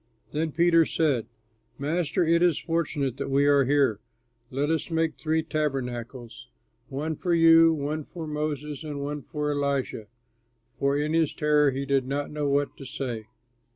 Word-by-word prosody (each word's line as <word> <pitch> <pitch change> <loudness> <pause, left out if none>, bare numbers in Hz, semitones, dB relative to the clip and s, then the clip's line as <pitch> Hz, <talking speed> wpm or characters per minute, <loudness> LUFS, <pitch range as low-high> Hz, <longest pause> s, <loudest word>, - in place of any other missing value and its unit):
Then 155 +1 -1
Peter 165 +1 +4
said, 140 -8 0 0.5
"Master, 165 +4 0
it 170 +1 +3
is 175 -4 +3
fortunate 145 -6 -2
that - - -4
we 140 +1 +3
are 140 -1 +4
here. 135 -6 +2 0.5
Let 140 +4 -1
us 160 +1 -1
make 165 -1 0
three 160 0 0
tabernacles, 125 -6 -4 0.4
one 150 +4 -3
for 175 +2 0
you, 165 0 +7
one 150 0 -3
for 170 -2 -7
Moses, 150 -1 -4
and 150 -2 -5
one 145 +1 -4
for 150 +1 -3
Elijah." 140 -6 -2 0.7
(For 140 +1 +2
in 150 +2 -1
his 165 -2 +1
terror 150 -1 +3
he 135 +1 -3
did 135 -2 +1
not 140 +2 -2
know 150 -1 -1
what 140 0 0
to 135 - -9
say.) 125 -5 -5
145 Hz, 160 wpm, -26 LUFS, 140-160 Hz, 0.7 s, you